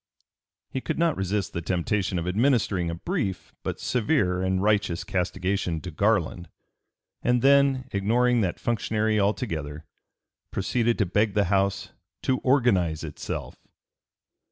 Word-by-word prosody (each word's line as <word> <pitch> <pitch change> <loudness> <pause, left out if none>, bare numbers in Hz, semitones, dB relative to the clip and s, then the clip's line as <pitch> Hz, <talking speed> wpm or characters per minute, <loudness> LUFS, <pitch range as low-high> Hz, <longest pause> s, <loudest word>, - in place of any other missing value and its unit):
He 130 - -3
could 160 - -3
not 165 -2 +2
resist 95 0 -2
the 85 - -3
temptation 90 +2 -1
of 85 +1 -3
administering 100 -4 +1
a 85 - -3
brief 105 - -3
but - - -4
severe 110 - +1
and 95 0 +1
righteous 100 -3 +1
castigation 90 -2 -1
to 90 - -7
Garland; 90 -2 0 0.7
and 125 -1 +1
then, 140 -2 +4
ignoring 120 +4 +2
that 90 -4 -1
functionary 110 -1 0
altogether, 80 - -2 0.6
proceeded 115 +4 0
to 105 - +2
beg 105 +3 +1
the 105 - +4
House 100 0 0 0.3
to 130 -1 +1
organize 100 - +2
itself. 75 -2 -6
100 Hz, 130 wpm, -26 LUFS, 90-120 Hz, 0.7 s, then